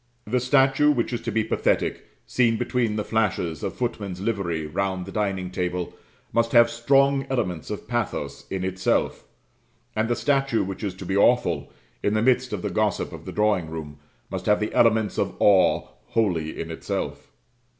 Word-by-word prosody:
The 125 +4 +1
statue 135 +3 +4
which 125 -4 +1
is 120 - -2
to - - -3
be 110 - +1
pathetic, 110 - 0 0.2
seen 115 -3 +2
between 120 -2 0
the 105 - -1
flashes 95 -8 -1
of - - -3
footmen's 105 -7 -3
livery 95 -7 -2
round 95 +3 -2
the 95 - -8
dining 95 -3 -2
table, 90 -1 -2 0.4
must 115 +1 +1
have 120 -1 +6
strong 135 +3 +3
elements 90 -11 -2
of 105 0 -6
pathos 120 -2 -3
in 95 -1 -3
itself; 95 0 0 0.7
and 110 +1 0
the 120 - +2
statue 135 -4 +1
which 95 +2 -6
is 100 -3 -3
to 95 - -8
be 95 +2 -1
awful, 100 - +2 0.3
in 105 - +1
the 110 - +2
midst 130 0 +2
of - - -4
the - - -2
gossip - - 0
of - - -9
the - - -5
drawing 105 -6 +1
room, 75 -2 -7 0.3
must - - -4
have 105 - +4
the 105 - -2
elements 110 -2 +3
of - - -1
awe 100 -3 +4 0.2
wholly 85 -9 -1
in 80 - -4
itself. 80 - -4
105 Hz, 180 wpm, -24 LUFS, 95-120 Hz, 0.7 s, have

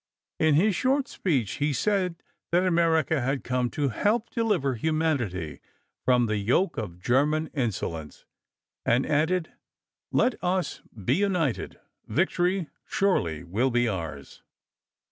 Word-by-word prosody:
In 155 -2 +4
his 195 +5 +3
short 270 +1 +1
speech 135 - -1
he 145 0 +2
said 185 +2 0 0.3
that 180 +2 +3
America 165 -4 +2
had 135 +2 -1
come 125 -1 0
to 145 0 -1
help 215 - 0
deliver 215 - +1
humanity 125 - -1 0.5
from 125 -1 +4
the 110 -1 0
yoke 125 - +1
of 95 -6 -5
German 150 - +1
insolence, 90 - -3 0.6
and 120 +3 +2
added: 160 +3 +1 0.6
"Let 255 - +1
us 180 0 -1 0.2
be - - +3
united. 180 - 0 0.3
Victory 175 - +1 0.2
surely 90 - 0
will 105 +10 0
be 120 -1 +2
ours." 80 -9 -5
150 Hz, 125 wpm, -27 LUFS, 120-180 Hz, 0.6 s, In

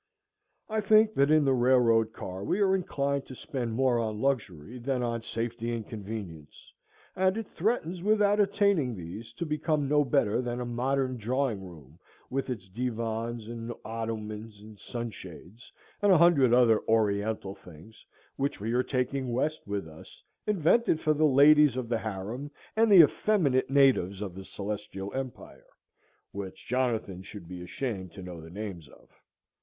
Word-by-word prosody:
I 220 0 -1
think 215 +1 +5
that 140 +1 +3
in 155 -1 +4
the 135 - +3
railroad 120 -3 +3
car 95 -3 -7
we 185 - 0
are 195 -2 +3
inclined 140 -7 -1
to 130 - -9
spend 130 -5 -4
more 130 -1 +2
on 110 -2 -2
luxury 115 - -2
than 125 0 -1
on 115 -1 -2
safety 115 +1 -3
and 110 -3 -6
convenience, 100 -8 -8 0.4
and 190 +2 +2
it 225 - -3
threatens 180 -3 -1
without 205 +1 +3
attaining 195 - +2
these 95 +6 -8
to 170 - -4
become 150 -1 0
no 150 +1 +3
better 125 -4 +1
than 120 -1 -3
a 125 - -3
modern 130 +2 -1
drawing 120 -2 -1
room, 80 -4 -13 0.3
with 135 +1 -2
its 105 -7 -5
divans, 115 +1 -3
and 115 0 -6
ottomans, 110 -1 -5
and 105 0 -14
sun 120 -1 -5
shades, 95 +5 -12 0.3
and 205 -1 +4
a 185 - +7
hundred 155 -7 +5
other 120 -3 +5
oriental 105 -2 +1
things, 90 +4 -15 0.3
which 140 +1 -1
we 110 +3 -2
are 125 - +3
taking 130 0 -2
west 150 +4 -1
with 100 -4 -3
us, 80 0 -14 0.2
invented 205 -1 +3
for 155 -1 +2
the 155 +1 +2
ladies 145 -1 +6
of 125 -2 -3
the 115 -2 0
harem 110 +7 -5 0.3
and 225 0 +4
the 185 -4 +10
effeminate 145 -7 +2
natives 135 -9 +3
of 100 -3 -5
the 95 +1 -9
Celestial 100 -1 -6
Empire, 130 -2 -7 0.6
which 100 -2 -7
Jonathan 115 -7 -1
should 95 -2 -10
be 90 0 -8
ashamed 95 -1 -4
to 95 - -10
know 90 -2 -8
the 80 - -11
names 90 -5 -7
of. - - -19
120 Hz, 165 wpm, -28 LUFS, 105-140 Hz, 0.6 s, the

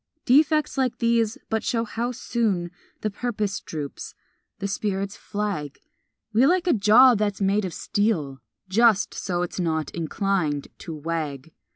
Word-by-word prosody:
Defects 300 +2 +3
like 255 -2 0
these 230 -1 +1
but 220 0 -1
show 230 -1 0
how 235 +2 -3
soon 215 -8 -1 0.3
The 215 - -1
purpose 210 -3 -2
droops, 150 -3 -7 0.4
the 200 - -3
spirits 200 0 -2
flag 200 -9 -4 0.6
We 240 +5 +5
like 360 +1 +2
a 350 - +4
jaw 230 +4 +7
that's 205 -2 -1
made 200 +1 +1
of 180 - -5
steel, 170 -11 -1 0.3
Just 215 +1 +3
so 175 -2 -2
it's 180 - -5
not 160 -4 -1
inclined 165 -3 -1
to 165 - -7
wag. 155 -2 -4
205 Hz, 145 wpm, -24 LUFS, 170-230 Hz, 0.6 s, jaw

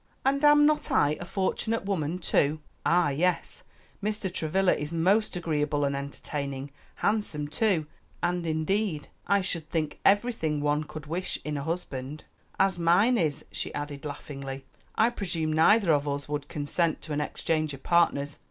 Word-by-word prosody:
"And 280 +2 +2
am 295 0 +7
not 300 0 +2
I 145 - +3
a 175 - -6
fortunate 195 +4 -1
woman, 175 -4 -1
too?" 155 -3 +1 0.2
"Ah, 175 -2 +3
yes, 170 +5 -1 0.4
Mr. 210 -3 -2
Travilla 180 +4 +2
is 150 +1 -4
most 190 +7 +2
agreeable 150 -4 0
and 140 0 0
entertaining, 140 0 -5 0.2
handsome 185 -9 0
too; 165 +1 +1 0.4
and 175 -1 0
indeed 160 0 -1 0.2
I 200 0 +3
should 175 -4 -3
think 155 -3 -2
everything 200 -8 +2
one 150 +1 +1
could 155 0 -8
wish 170 +4 -2
in 150 0 -2
a 140 - -2
husband; 150 -4 -4 0.4
as 190 -2 +3
mine 180 +9 +4
is," 155 -5 -1
she - - -4
added 145 -1 -5
laughingly. 135 -2 -6 0.3
"I 225 +2 +4
presume 170 -8 -2
neither 170 +3 +5
of 145 0 +1
us 145 0 -2
would 145 -1 -3
consent 155 +3 -1
to 155 - -4
an 150 - 0
exchange 155 +1 -1
of 135 - -16
partners. 150 -4 +2
160 Hz, 160 wpm, -28 LUFS, 145-190 Hz, 0.4 s, am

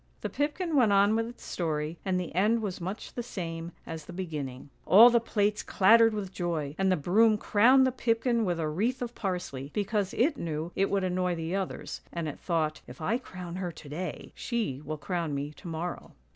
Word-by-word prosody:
" - - -36
The - - -3
pipkin 305 +3 -1
went 240 -7 +5
on 200 +2 +5
with 225 0 0
its 240 - -11
story, 155 -1 -2
and 185 -2 0
the 180 - -5
end 215 +6 +2
was 190 -4 -4
much 190 +5 -5
the 240 - -3
same 170 -7 -5
as 160 -2 -7
the - - -9
beginning. 150 -7 -5
" - - -36
All 230 +6 +9
the 235 - +5
plates 210 -2 0
clattered 225 +4 +5
with 195 -3 -4
joy, 165 -6 -2
and 190 0 +3
the - - +4
broom 210 +8 +4
crowned 250 +6 +5
the 260 - +2
pipkin 235 -1 +1
with 175 -4 -1
a 160 - 0
wreath 230 +12 -1
of 240 -1 -5
parsley, 175 - -4
because 205 -1 -1
it 285 +4 +2
knew 160 0 -3
it 195 - +2
would 195 -1 +1
annoy 180 -1 0
the 165 +2 -3
others; 195 -2 -4
and 170 -2 -3
it 150 - -6
thought, 160 -3 -1
' - - -35
If - - -11
I 225 +10 0
crown 180 -7 -8
her 180 -2 -3
to 155 -3 -12
day, 175 +5 -5
she 215 - -2
will 155 +1 -4
crown 165 -2 -2
me 140 +1 -3
to 175 - -12
morrow.' 170 +2 -5
185 Hz, 220 wpm, -29 LUFS, 165-225 Hz, -, All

